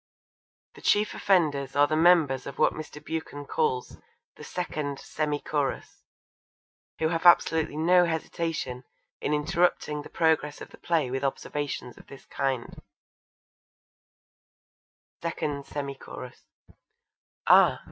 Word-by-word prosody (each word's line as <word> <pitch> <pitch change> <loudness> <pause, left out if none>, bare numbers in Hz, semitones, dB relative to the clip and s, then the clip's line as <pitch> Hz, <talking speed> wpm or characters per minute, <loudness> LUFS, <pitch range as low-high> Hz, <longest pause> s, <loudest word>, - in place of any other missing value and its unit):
The - - -15
chief 210 +1 +2
offenders 145 -8 +1
are 145 0 +6
the 155 +1 -1
members 155 -6 +4
of 140 - -8
what - - +3
Mr. 155 -1 -8
Buchan 160 -3 -5
calls 450 - -1 0.4
'The - - -12
2nd. 150 -5 -4
Semi 150 0 -2
chorus,' 145 -3 -3 1.0
who 160 - +1
have 165 +1 +2
absolutely 160 -3 +4
no 175 +3 +5
hesitation 160 -5 -3 0.4
in - - -2
interrupting 150 0 +1
the - - -11
progress 160 -3 +1
of - - -10
the - - -15
play 160 -7 0
with 135 +1 -2
observations 140 -2 -3
of - - -17
this 135 - -13
kind: 135 -4 -3 2.4
2ND. 150 -4 -3
semi 140 -1 -4
chorus 125 -2 -11 1.0
Ah! - - +6
150 Hz, 120 wpm, -27 LUFS, 140-165 Hz, 2.4 s, are